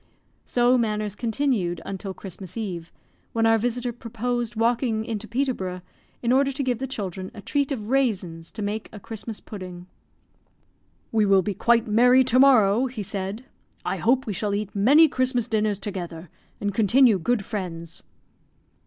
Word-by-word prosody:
So 245 +1 +3
matters 210 -3 -1
continued 225 - -1
until 195 0 -5
Christmas 190 +1 -9
Eve, 180 -7 -5 0.4
when 225 0 +2
our 225 0 +4
visitor 245 +1 -2
proposed 240 0 -3
walking 230 -1 +1
into 220 -2 -4
Peterborough, 225 -9 -2 0.4
in 235 - +2
order 275 +2 +3
to 275 +1 -3
give 250 -3 -1
the 265 - -3
children 190 -6 -5
a 210 - -8
treat 285 -1 0
of 220 -6 -3
raisins 190 -11 0
to 215 - -5
make 210 +2 -3
a 210 - -9
Christmas 220 +1 -7
pudding. 180 -4 -9 1.3
"We 215 -2 +3
will 195 -1 +5
be 205 - -2
quite 235 +4 +3
merry 245 +4 +5
to 255 0 +2
morrow," 250 -3 +5
he 240 -4 -5
said. 200 +5 -5 0.4
"I - - -1
hope 255 +3 +2
we 210 - -3
shall 200 +2 -1
eat 205 0 -4
many 280 +11 +6
Christmas 255 -4 0
dinners 215 -3 0
together, 175 -5 -6 0.3
and 205 -1 -2
continue 225 +1 +4
good 215 +3 0
friends." 170 -5 -6
220 Hz, 160 wpm, -24 LUFS, 195-245 Hz, 1.3 s, many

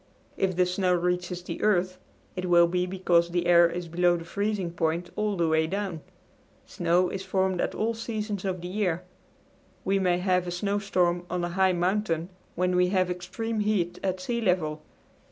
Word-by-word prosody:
If 185 -2 0
the 180 0 +3
snow 180 0 +1
reaches 180 0 -1
the - - -6
earth 185 -3 +1 0.4
it 185 - -3
will 170 -1 +7
be 180 +1 0
because 180 -2 +2
the 175 0 -1
air 170 -1 +6
is 175 +1 -5
below 175 +1 +2
the 165 - -8
freezing 200 -1 -2
point 170 +1 -1
all 210 -2 -1
the 170 -1 +2
way 160 0 +2
down. 190 -3 -3 0.6
Snow 175 +1 +1
is 195 - -5
formed 190 -2 0
at - - -2
all 225 +2 0
seasons 215 -3 -4
of 185 -3 -2
the 175 - -5
year. 180 -3 -1 0.8
We 195 +1 +2
may 180 -2 +2
have 180 -1 +1
a - - -2
snowstorm 180 -2 0
on 180 -1 -2
a 175 - -1
high 190 +1 +2
mountain 175 -2 0 0.3
when 180 +1 +1
we 180 0 +4
have 185 -1 +1
extreme 215 +6 -4
heat 205 -5 0
at 185 -1 -1
sea 235 +5 -2
level. 165 -7 0
180 Hz, 185 wpm, -27 LUFS, 175-195 Hz, 0.8 s, will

